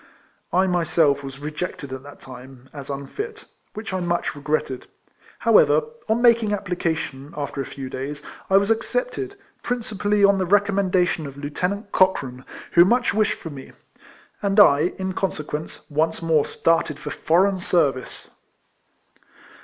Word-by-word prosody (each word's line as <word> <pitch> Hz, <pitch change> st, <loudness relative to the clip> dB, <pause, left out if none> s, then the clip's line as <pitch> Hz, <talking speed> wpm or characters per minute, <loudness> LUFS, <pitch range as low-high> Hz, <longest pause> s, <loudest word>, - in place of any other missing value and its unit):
I 185 Hz, +2 st, +3 dB
myself 165 Hz, -5 st, +2 dB
was 135 Hz, 0 st, -7 dB
rejected 150 Hz, -1 st, -5 dB
at 130 Hz, -, -6 dB
that 145 Hz, +1 st, -13 dB
time, 130 Hz, 0 st, -12 dB
as 140 Hz, -2 st, -8 dB
unfit, 415 Hz, -, -6 dB, 0.3 s
which 215 Hz, -2 st, -6 dB
I 185 Hz, -, 0 dB
much 175 Hz, -3 st, -1 dB
regretted. 145 Hz, -3 st, -2 dB, 0.5 s
However, -, -, +5 dB, 0.3 s
on 230 Hz, +2 st, +2 dB
making 230 Hz, -3 st, +4 dB
application, 165 Hz, -7 st, -3 dB
after 140 Hz, -1 st, -3 dB
a 135 Hz, -, -5 dB
few 135 Hz, -2 st, -7 dB
days, 140 Hz, +3 st, -6 dB, 0.3 s
I 190 Hz, -, +6 dB
was 200 Hz, +2 st, +2 dB
accepted, 400 Hz, -, -2 dB, 0.2 s
principally 210 Hz, -4 st, +1 dB
on 200 Hz, -1 st, +4 dB
the 185 Hz, -, 0 dB
recommendation 190 Hz, -5 st, +2 dB
of 140 Hz, 0 st, -10 dB
Lieutenant 180 Hz, +8 st, -3 dB
Cochrane, 135 Hz, -9 st, +1 dB, 0.3 s
who 170 Hz, -, +7 dB
much 240 Hz, +6 st, +2 dB
wished 215 Hz, -1 st, +2 dB
for 165 Hz, -, -8 dB
me; 135 Hz, -2 st, -10 dB, 0.7 s
and 200 Hz, 0 st, +2 dB
I, 155 Hz, -3 st, +6 dB
in 190 Hz, 0 st, -3 dB
conse 185 Hz, -5 st, -2 dB
quence, 150 Hz, +2 st, -6 dB
once 160 Hz, +2 st, +1 dB
more 165 Hz, -3 st, +2 dB
started 165 Hz, -3 st, +1 dB
for 150 Hz, -1 st, -6 dB
foreign 185 Hz, +4 st, +2 dB
service. 145 Hz, -8 st, -1 dB
170 Hz, 145 wpm, -23 LUFS, 145-200 Hz, 0.7 s, who